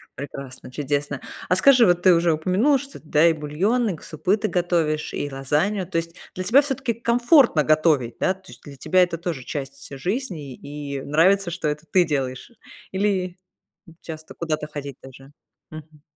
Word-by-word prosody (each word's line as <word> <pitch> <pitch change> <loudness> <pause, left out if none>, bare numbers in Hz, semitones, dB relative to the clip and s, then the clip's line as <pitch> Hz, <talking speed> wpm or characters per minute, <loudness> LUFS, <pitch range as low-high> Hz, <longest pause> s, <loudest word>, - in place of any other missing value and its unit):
Прекрасно, 135 -2 -8
чудесно. 145 0 -2 0.3
А 180 - +3
скажи, 250 +5 +6
вот 175 -2 +3
ты 185 - +7
уже 170 -1 +3
упомянула, 185 - +2
что 275 0 -9
да, 155 0 +3
и 170 - +6
бульон, 175 +11 0
и 180 - -2
к - - -15
супы 180 +5 0
ты 215 0 -2
готовишь, 170 -4 0
и 145 - -3
лазанью. 155 +8 -1
То 185 - -2
есть 165 0 -7 0.2
для 185 - -3
тебя 235 +9 +5
все-таки 265 -4 -2
комфортно 235 - +4
готовить, 150 -6 +2
да? 185 - +2
То 190 -1 -17
есть - - -14
для 145 -2 -11
тебя 185 +7 +2
это 175 -2 +1
тоже 165 -6 -4
часть 140 -1 -6
жизни, 175 - -4
и 140 0 -7
нравится, 175 +7 +3
что 170 -2 -2
это 150 +2 -5
ты 180 +3 +4
делаешь, 135 - -3 0.4
или 190 -2 -1 0.7
часто 155 -1 -9
куда-то 155 -2 -3
ходить 140 -2 -7
даже. 135 +1 -14 0.4
Мгм. 155 -1 -12
165 Hz, 175 wpm, -23 LUFS, 145-190 Hz, 0.7 s, ты